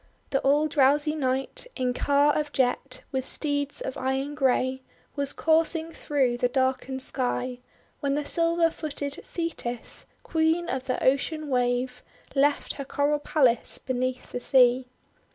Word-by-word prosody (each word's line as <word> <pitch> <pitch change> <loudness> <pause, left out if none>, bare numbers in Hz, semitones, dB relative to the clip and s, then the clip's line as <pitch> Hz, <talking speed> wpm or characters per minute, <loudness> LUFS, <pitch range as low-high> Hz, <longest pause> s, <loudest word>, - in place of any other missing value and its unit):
The 270 - +2
all 290 +3 +3
drowsy 290 +1 +3
Night, 270 - -1
in 250 -2 0
car 285 +3 +3
of 300 -1 -1
jet 255 0 0
with 265 -1 -1
steeds 285 +1 -1
of 260 - -4
iron 265 +2 -1
grey, 260 -2 +1 0.3
was 280 -1 0
coursing 325 0 +1
through 270 -7 0
the 245 - +3
darkened 260 0 0
sky, 250 -1 -2 0.4
when 280 -1 0
the 295 0 -2
silver 335 +1 +3
footed 285 -3 -4
Thetis, 290 -8 -3 0.2
Queen 320 +1 +1
of 260 0 -3
the 255 - -1
Ocean 295 +3 +1
Wave, 250 0 0 0.3
left 285 +1 +2
her 280 - -6
coral 285 +2 0
palace 260 -6 +2
beneath 255 0 -3
the - - -3
sea. 250 -1 +4
275 Hz, 140 wpm, -26 LUFS, 255-295 Hz, 0.4 s, sea